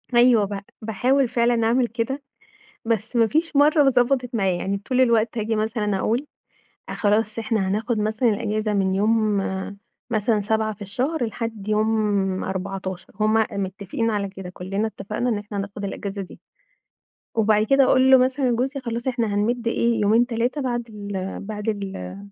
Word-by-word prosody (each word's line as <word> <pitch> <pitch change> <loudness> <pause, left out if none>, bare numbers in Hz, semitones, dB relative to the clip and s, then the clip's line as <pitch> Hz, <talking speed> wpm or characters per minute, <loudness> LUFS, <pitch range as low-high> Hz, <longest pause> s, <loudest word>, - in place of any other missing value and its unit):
أيوه 240 -3 +6
ب 200 0 -4 0.2
باحاول 250 +5 +1
فعلًا 235 -1 +2
أعمل 240 +1 +2
كده، 235 +5 -3 0.6
بس 225 +1 -1
ما 230 -1 +5
فيش 315 +5 0
مرة 290 -1 +5
ضبطت 250 0 +1
معايا، 195 -5 +1
يعني 195 +2 -2
طول 255 +6 -1
الوقت 235 -2 +2
هاجي 220 +1 -1
مثلًا 215 -2 -1
أقول: 235 +9 0 0.6
خلاص 215 +1 0
إحنا 220 -3 0
هناخد 220 +4 -1
مثلًا 220 +3 +1
الأجازة 215 0 -1
من 190 -2 +1
يوم 215 0 +2 0.7
مثلًا 220 -1 +1
7 220 +1 0
في 205 - -22
الشهر 255 +8 -1
لحد 225 -2 -5
يوم 210 -3 +1
14، 190 -1 -5
هم 215 0 +2 0.2
متفقين 200 +3 -2
على 200 -2 -1
كده، 190 -2 -8
كلنا 195 +4 -3
اتفقنا 215 +3 -3
إن 220 - 0
إحنا 205 0 -6
هناخد 200 +1 -5
الأجازة 200 0 -5
دي. 185 - -10 1.0
وبعد 215 -1 +3
كده 275 +4 +5
أقول 260 0 +4
له 265 - +9
مثلًا 255 0 +2
جوزي 265 +4 -1
خلاص 235 -1 -4
إحنا 240 -3 0
هنمد 235 +3 0
إيه 235 0 +1
يومين 220 +4 +4
3 245 +4 -1
بعد 240 -2 -2
ال 200 -3 -5
بعد 210 +1 -4
ال 190 - -5
220 Hz, 160 wpm, -23 LUFS, 205-240 Hz, 1.0 s, له